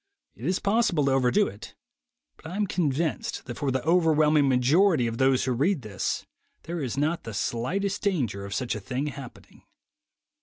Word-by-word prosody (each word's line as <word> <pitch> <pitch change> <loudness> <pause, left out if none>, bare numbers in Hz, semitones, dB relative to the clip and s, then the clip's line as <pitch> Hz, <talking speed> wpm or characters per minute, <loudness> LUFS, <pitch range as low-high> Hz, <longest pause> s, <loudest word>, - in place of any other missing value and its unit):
It - - -10
is 185 - +1
possible 200 -8 +1
to 135 - +2
overdo 135 +10 +3
it; 100 - -9 0.6
but - - -12
I 175 - -6
am 210 0 +1
convinced 160 -4 -1
that 120 -2 -7
for 140 - 0
the 130 -1 -1
overwhelming 155 -4 +3
majority 140 +4 +3
of 115 0 -3
those 130 -1 +3
who 130 - 0
read 145 +5 +1
this, 100 -3 -3 0.4
there 170 0 -4
is 130 -1 -3
not 160 +4 0
the 115 -2 -7
slightest 185 - -2
danger 130 - -1
of 100 0 -5
such 125 +2 -1
a - - -4
thing 130 +2 -3
happening. 140 -4 -9
145 Hz, 180 wpm, -26 LUFS, 125-175 Hz, 0.6 s, overdo